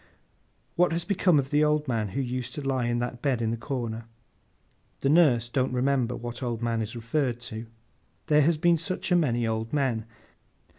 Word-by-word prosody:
'What 180 -1 +3
has 170 +1 -2
become 180 -4 +3
of 135 -1 0
the 150 +1 +4
old 150 0 +2
man 115 -4 0
who - - +2
used 125 -1 -4
to 145 -2 -4
lie 130 -3 0
in 120 0 0
that 120 0 -3
bed 130 -3 +1
in 115 -1 0
the - - 0
corner?' 115 -3 -4 1.0
The 135 - +2
nurse 140 -8 +4
don't 130 +1 0
remember 125 -1 +1
what 120 +1 -6
old 120 -2 -3
man 115 -1 0
is 110 +2 -5
referred 120 +1 -1
to. 115 -1 -7 0.6
There 150 0 +4
has 160 +2 +3
been 170 +1 +3
such 185 +3 -3
a - - +6
many 120 -9 +2
old 110 +1 -2
men. 130 -7 0
125 Hz, 195 wpm, -27 LUFS, 115-150 Hz, 1.0 s, a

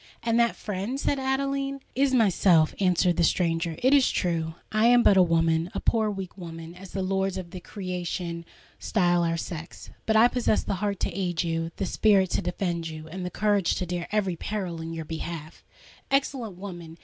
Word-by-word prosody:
"And 230 0 +2
that 235 -1 +3
friend—" 210 +6 -4
said 280 -1 0
Adeline. 275 +1 -1
"Is 275 +1 +2
myself," 185 -9 +4
answered 180 -2 +2
the - - +3
stranger. 165 -1 +1
"It 260 +2 +5
is 275 -3 +5
true, 165 -3 -1 0.2
I 215 +1 +3
am 240 0 +6
but 200 - +6
a 190 - +7
woman—a 165 0 +1
poor, 220 -2 +2
weak 195 -3 -6
woman, 165 -1 -8
as 185 +1 -11
the 190 +1 -3
lords 190 0 0
of 175 -2 -6
the 185 - -7
creation 180 -3 -4 0.4
style 175 -4 +2
our 165 0 0
sex;—but 170 +6 -5
I 225 +2 +7
possess 245 -3 +1
the - - -2
heart 205 -2 -1
to - - 0
aid 180 -3 -1
you—the 165 0 -2
spirit 195 -4 +3
to - - +1
defend 175 -2 -2
you—and 160 +3 -7
the 180 - -3
courage 205 -1 +1
to 180 - -2
dare 175 -1 -4
every 200 -4 0
peril 180 -3 -4
in 165 0 -5
your 165 -1 -5
behalf!" 160 0 -6 0.5
"Excellent 265 -7 0
woman! 175 -4 -8
185 Hz, 185 wpm, -26 LUFS, 170-215 Hz, 0.5 s, a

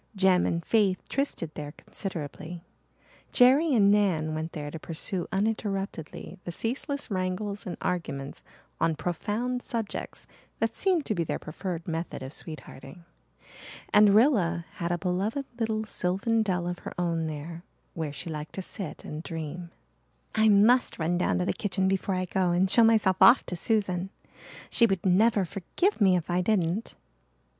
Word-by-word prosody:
Jem 190 -2 +4
and 170 0 -2
Faith 205 -5 +3
trysted 225 - -2
there 150 -1 -6
considerably; 170 -1 -6 0.7
Jerry 275 +6 +5
and 200 -3 +5
Nan 175 -7 +2
went 160 +1 -4
there 145 -1 -5
to 160 - -6
pursue 170 +3 -2
uninterruptedly 195 -4 -3
the 175 - -5
ceaseless 265 - -3
wrangles 190 +2 -2
and 180 - -4
arguments 140 -6 -3 0.4
on 165 -1 +2
profound 215 +10 -2
subjects 230 -5 -4 0.3
that 225 0 -1
seemed 365 -6 +2
to - - 0
be 170 -4 0
their - - -2
preferred 170 +1 -6
method 165 -3 -4
of 130 +2 -7
sweethearting. 155 0 -8 0.9
And 210 -1 +7
Rilla 190 - +3
had 170 0 -2
a 175 - +1
beloved 195 +9 -1
little 220 -1 -1
sylvan 205 +4 0
dell 180 -5 0
of 175 0 -3
her - - -8
own 165 -2 0
there 160 +2 -6 0.3
where 160 -3 -3
she 145 - -7
liked 150 0 -6
to 190 - -3
sit 190 -2 -7
and 150 +1 -5
dream. 165 +1 -6 0.6
"I 220 0 +4
must 220 +5 +4
run 175 +2 0
down - - +1
to 180 - 0
the - - 0
kitchen 190 -2 -1
before 190 0 0
I 185 0 -1
go 185 0 0
and 175 +2 +3
show 235 - +7
myself 220 -5 +4
off 255 - +8
to 180 - -4
Susan. 190 -2 0 0.6
She 235 - +5
would 195 -3 -1
never 200 +2 +4
forgive 205 - -1
me 190 -2 +6
if 175 -3 -1
I 175 +1 +1
didn't." 185 +1 0
185 Hz, 160 wpm, -28 LUFS, 170-215 Hz, 0.9 s, off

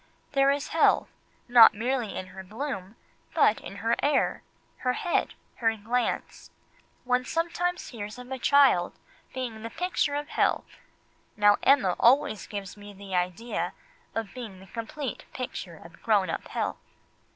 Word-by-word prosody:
There 275 -1 +4
is 285 +1 0
health, 325 - +3 0.4
not 240 -3 +8
merely 240 0 -1
in 185 - -4
her 190 +1 -9
bloom, 210 -1 -5 0.4
but 225 -9 +4
in - - -9
her 230 +1 +3
air, 290 - +1 0.4
her 250 -1 0
head, 345 +6 -1 0.2
her 225 -1 +1
glance. 235 +4 -2 0.5
One 250 0 +1
sometimes 345 +4 -1
hears 210 -2 -7
of 250 +1 -10
a 265 - -3
child 270 -11 +4 0.3
being 245 -4 -5
"the 230 - -5
picture 320 -2 -1
of 295 +1 -3
health," - - +1 0.7
now 205 -1 +5
Emma 250 -10 +4
always 235 -4 +3
gives 200 -3 -6
me 205 0 -11
the 195 0 -9
idea 180 +6 -1 0.4
of 225 -3 -3
being 225 -7 -8
the 190 - -13
complete 235 +6 -6
picture 200 -9 -5
of 170 +1 -15
grown 200 -6 +2
up - - -4
health. - - -2
230 Hz, 150 wpm, -27 LUFS, 205-270 Hz, 0.7 s, not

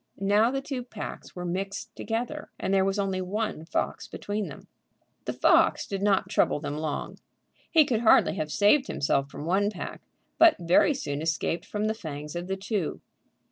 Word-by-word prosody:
Now 205 +4 +3
the 270 +1 -2
two 270 -3 -4
packs 240 -4 -8
were 180 -1 -5
mixed 195 +5 -4
together, 245 +7 -4
and 190 - -1
there 190 -1 +4
was 195 +1 0
only 195 -2 -1
one 195 -3 -3
fox - - -2
between 205 0 -4
them. - - -11 0.6
The - - -2
fox - - +4
did 195 -1 -4
not 200 -1 +2
trouble - - +2
them 145 -1 -4
long. 155 -1 -4 0.5
He 315 -3 +6
could 235 -5 0
hardly 225 - +5
have 155 -4 -3
saved 235 - +4
himself 140 0 0
from 145 - -7
one 195 +4 +2
pack, 195 -4 -7 0.4
but 335 -1 +8
very 175 - +4
soon 145 - -3
escaped 165 +1 -1
from 210 0 -2
the 215 - +1
fangs 150 -6 -7
of 175 +1 -4
the 190 0 -2
two. 195 -3 -2
195 Hz, 180 wpm, -27 LUFS, 170-220 Hz, 0.6 s, but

